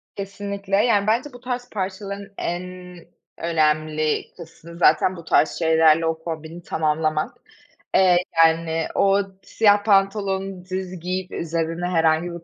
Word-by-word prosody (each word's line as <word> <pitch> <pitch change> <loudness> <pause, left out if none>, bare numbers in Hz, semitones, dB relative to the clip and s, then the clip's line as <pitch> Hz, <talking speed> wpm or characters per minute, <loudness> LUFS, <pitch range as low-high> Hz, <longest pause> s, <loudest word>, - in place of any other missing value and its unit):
Kesinlikle, 200 0 -4
yani, 205 -1 +3
bence 245 +6 0
bu 245 - -11
tarz 245 0 -5
parçaların 200 0 -5
en 175 +1 -3 0.7
önemli 155 -1 0
kısmı 170 0 -12
zaten 185 +1 +3
bu 170 - -10
tarz 155 - +3
şeylerle 160 -1 +4
o 160 0 -2
kombini 160 +1 -7
tamamlamak. 155 -1 -1 0.6
Eee, 185 -2 +5 0.3
yani, 160 0 0
o 195 0 +3 0.2
siyah 205 -2 +3
pantolonu 195 -2 +1
düz 185 -1 -5
giyip 180 +2 -4
üzerine 165 +1 -3
herhangi 165 0 +1
bir 170 -1 -9
180 Hz, 125 wpm, -22 LUFS, 160-195 Hz, 0.7 s, Eee